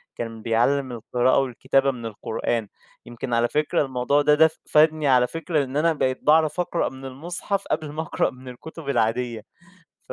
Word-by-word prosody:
كان 115 -1 -6
بيعلّم 125 +4 +1
القراءة 120 +2 +1
والكتابة 135 +1 +1
من 120 -3 -8
القرآن، 110 +1 -3 0.4
يمكن 120 +1 -6
على 115 0 +3
فكرة 150 0 +1
الموضوع 130 +2 +1
ده 150 +1 +4
ده 160 +1 +6
ف 160 - -11 0.2
فادني 155 0 +4
على 125 -2 +4
فكرة 165 0 -1
إن 135 +1 -4
أنا 165 +2 +3
بقيت 130 -4 -1
باعرف 155 +2 +3
أقرأ 175 -1 0
من 135 0 -11
المصحف، 175 +8 -4
قبل 155 -2 -2
ما 155 +2 -3
أقرأ 160 - 0
من 130 0 -14
الكتب 140 +4 -9
العادية. 115 -1 0 0.7
ف - - -5
135 Hz, 180 wpm, -24 LUFS, 120-155 Hz, 0.7 s, ده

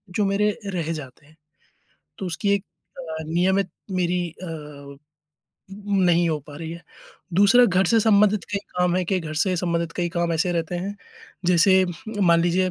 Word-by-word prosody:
जो 210 - +2
मेरे 200 +2 +2 0.2
रह 165 -2 -2
जाते 140 -2 -9
हैं। 155 +2 -22 0.8
तो 190 - -4
उसकी 180 +4 -1
एक 200 0 -2 0.3
अ, 160 -2 -6
नियमित 185 +3 +1 0.2
मेरी 180 -1 0
अ, 150 -5 -9 1.1
नहीं 175 -1 +3
हो 155 - 0
पा 145 -1 -10
रही 165 0 -6
है। 170 +1 -10 0.5
दूसरा 205 +6 +6
घर 190 -2 +2
से 225 +4 +4
संबंधित 210 -2 +3
कई 200 - +1 0.2
काम 180 0 +2
हैं 185 - 0
कि 185 -1 0
घर 155 -1 -6
से 180 +3 +1
संबंधित 170 -1 -1
कई 175 -1 0
काम 170 -1 -1
ऐसे 170 +2 0
रहते 170 +1 -2
हैं, 200 +3 -5 0.5
जैसे 185 +2 +5 0.4
मान 170 -2 +5
लीजिए 180 +2 +1
175 Hz, 170 wpm, -23 LUFS, 165-190 Hz, 1.1 s, दूसरा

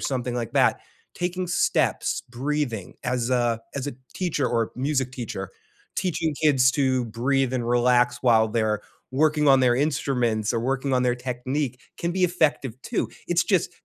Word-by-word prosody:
something 125 -2 -2
like 120 -3 -3
that, - - +3 0.3
taking 180 +1 -2
steps, 175 - +1
breathing 130 -5 -2
as, 125 0 -1
uh, 120 -2 +2 0.2
as 140 0 -3
a 145 - -6 0.2
teacher 160 -7 0
or 115 -2 0
music 130 -1 -1
teacher, 125 -3 -5 0.5
teaching 160 -4 -1
kids 135 -4 +5
to 130 -3 +1
breathe 130 +3 0
and 120 -2 -1
relax 120 0 +3
while 115 -3 +5
they're 110 -2 0 0.3
working 150 +1 +3
on 135 -1 +6
their 125 -2 +4
instruments 125 -6 0
or 115 - 0
working 135 +2 -1
on 125 -1 +3
their 125 -1 +2
technique 125 +2 -3 0.2
can 170 0 -1
be 185 - -1
effective 145 -8 0
too. 235 - -2 0.2
It's 175 +1 +2
just 180 -3 +1
130 Hz, 160 wpm, -25 LUFS, 120-150 Hz, 0.5 s, on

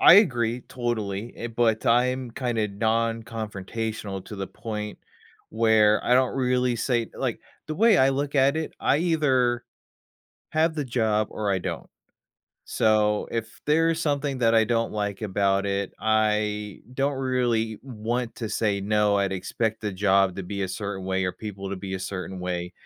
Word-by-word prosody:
I - - +9
agree 120 - +4
totally, 115 -3 -3
eh 120 - -4
but 115 -1 +1
I'm 125 +1 +2
kinda 115 -3 -1
non-confrontational 110 -2 -2
to 105 - -8
the 95 0 -3
point 105 -1 -6 0.5
where 110 -1 +3
I 125 - +2
don't 130 +1 +2
really 125 -1 +1
say 115 -1 0
like, - - -2 0.3
the 155 - -3
way 220 +2 +5
I 135 +1 +5
look 140 +1 -2
at 140 +1 +4
it, 160 -1 -3
I 140 - +3
either 135 -8 +2 0.9
have 160 +1 +2
the 150 - -2
job 110 -4 +1
or 105 -2 -2
I 95 - +2
don't. - - -5 0.8
So, 105 -1 +2
if 115 -1 -4
there's 165 +2 +3
something 145 -3 -1
that 115 -2 +3
I 110 -1 +5
don't 115 +1 0
like 105 -2 -2
about 100 -1 +1
it, 100 -1 -1
I 105 -1 0
don't 140 +2 +1
really 120 -4 0
want 120 -1 -3
to 115 - -4
say 105 -2 0
no, 105 0 +2
I'd 100 -1 0
expect 110 +4 -2
the 105 -2 -3
job 95 -1 +3
to 100 - -4
be 100 +2 -4
a 95 - -1
certain 100 0 -4
way 95 0 0
or 90 - 0
people 100 -1 -7
to 100 - -3
be 95 0 -5
a - - -2
certain 95 0 -5
way, 90 -1 -3
110 Hz, 170 wpm, -25 LUFS, 100-125 Hz, 0.9 s, I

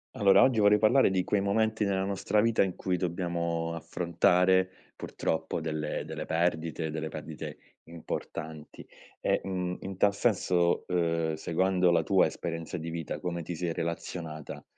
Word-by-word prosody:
Allora, 100 -5 +6
oggi 125 -4 +3
vorrei 105 0 +6
parlare 110 +5 +4
di 95 -1 +1
quei 100 +2 +1
momenti 110 +2 +1
nella 95 -1 0
nostra 100 +2 0
vita 115 +1 +3
in 95 -2 +1
cui 90 -1 -1
dobbiamo 85 -2 -2
affrontare, 90 +3 +2 0.3
purtroppo, 80 0 -3
delle 80 -1 -3
delle 80 -1 -5
perdite, 80 -1 -1
delle 80 0 -4
perdite 75 -1 -7 0.3
importanti, 80 -2 -7 0.3
e, - - +1
mhmm, 90 -2 -3
in 95 -1 -6
tal 100 +1 +4
senso, 90 -5 +1
uhm, 85 -2 +1
seguendo 90 +3 +1
la 85 - +3
tua - - +4
esperienza 80 0 -5
di 85 0 -5
vita 80 -2 -4
come 85 -1 -3
ti 85 +2 -5
sei 85 0 -2
relazionata 80 -1 -5
85 Hz, 150 wpm, -29 LUFS, 80-95 Hz, 0.3 s, Allora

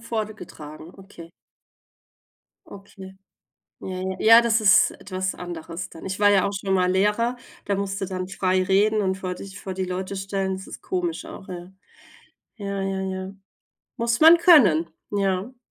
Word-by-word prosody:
vorgetragen, 210 -9 -7
okay. 190 -4 -13 1.4
Okay. 195 -1 -12 0.6
Ja, - - -7
ja. 185 0 -4
Ja, 225 +1 +8
ist 225 -3 +4
etwas 185 -1 -4
anderes 170 0 -7
dann. 165 - -12
Ich 190 +1 -5
war 205 0 +6
ja 195 -2 +4
auch 200 - -2
schon 195 -1 -3
mal 180 -1 +2
Lehrer, 210 +6 +1 0.3
da 200 - -1
musst 200 0 -3
du - - -1
dann 185 -1 -5
frei 185 -1 0
reden 205 +3 +2
und 190 -1 0
vor 185 -1 -4
dich 190 0 -10
vor 190 -1 -6
die 190 0 -2
Leute 185 +2 -4
stellen. 195 0 -2
Das 190 - -10
ist - - -10
komisch 350 -3 -3
auch, 315 -12 -11
ja. 180 0 -8 0.8
Ja, 200 -2 -4
ja, 195 0 -2
ja. 190 0 -5 0.6
Muss 235 -1 0
man 325 +2 +9
können, 205 - +5 0.2
ja. 200 +4 -1
195 Hz, 160 wpm, -24 LUFS, 185-210 Hz, 1.4 s, man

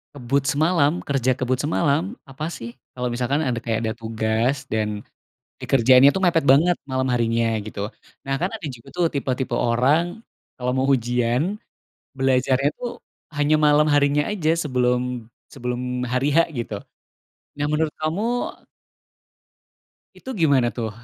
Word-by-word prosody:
Kebut 135 +1 0
semalam, 155 +2 +2
kerja 130 -2 +1
kebut 130 0 +1
semalam, 165 - 0
apa 150 +5 -5
sih. 120 -5 -8 0.2
Kalo 125 0 -3
misalkan 125 +4 -1
ada 125 - 0
kayak 115 -2 -1
ada 110 -1 -2
tugas 115 +4 -1
dan 105 -2 -2 0.5
dikerjainnya 130 +2 +5
tuh 190 - -2
mepet 170 -5 +2
banget, 150 +6 +5
malam 130 -1 -1
harinya 115 -2 +1
gitu. 105 -1 -5 0.4
Nah, 135 - 0
kan 180 +7 -2
ada 215 -8 -6
juga 125 -4 -10
tuh 175 -1 0
tipe-tipe 130 -3 -2
orang 140 - +1 0.4
kalo 125 0 -1
mau 130 - +1
ujian, 125 - +1 0.6
belajarnya 135 0 +2
tuh 245 -1 -6 0.3
hanya 145 +1 +2
malam 150 0 +4
harinya 145 0 +2
aja, 165 -7 +1
sebelum 125 -5 0 0.2
sebelum 125 0 -3
hari 130 +3 +1
H - - +7
gitu. 120 -5 -4 0.8
Nah, 145 - 0
menurut 155 +1 +1
kamu 155 +6 -1 2.0
itu - - -10
gimana 140 -6 +4
tuh 115 -2 -2
135 Hz, 135 wpm, -22 LUFS, 125-150 Hz, 2.0 s, H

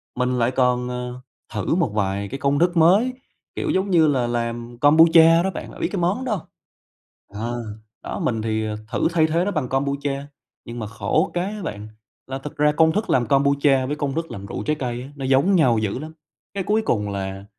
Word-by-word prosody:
mình 125 0 0
lại 120 +1 +2
còn, 125 -1 +1
ờ, 125 0 -5 0.3
thử 105 +8 -1
một 170 -7 +1
vài 100 -1 -1
cái 135 - -6
công 140 +1 +1
thức 175 0 +2
mới, 195 +10 +4 0.4
kiểu - - -2
giống 190 +1 0
như 165 -4 +4
là 130 -5 +1
làm 120 0 -3
Kombucha 165 +3 +6
đó 190 - 0
bạn, - - -7
đã - - -12
biết - - 0
cái 195 - -2
món 200 +10 0
đó 250 - -2
hông? 180 - -8 0.9
Ờ, 120 +3 -4 0.4
đó - - -5
mình 115 -2 -1
thì, 110 0 -1
à, 105 - -3 0.2
thử - - +1
thay 160 -2 +3
thế 165 +3 +1
nó 205 - -1
bằng 155 -9 -2
Kombucha, 140 +1 -2 0.4
nhưng 120 +1 -8
mà 110 - -4
khổ 110 +1 0
cái 175 0 0
á 210 - -7
bạn, 105 - -6 0.4
là 135 +1 -5
thực 145 +2 -9
ra 150 0 +3
công 160 +1 +4
thức 210 +4 -2
làm 120 -2 +2
Kombucha 140 0 +3
với 145 +3 -3
công 145 -2 -2
thức 165 0 -3
làm 100 0 -7
rượu 100 - -5
trái 150 - +1
cây 125 -4 -4
á, 135 - -10
nó 135 - -6
giống 135 +9 +3
nhau 125 -9 +4
dữ 105 +2 -2
lắm, 155 +3 -8 0.4
cái 200 - -1
cuối 210 +4 +1
cùng 105 - 0
là 95 0 -5
135 Hz, 225 wpm, -22 LUFS, 120-165 Hz, 0.9 s, Kombucha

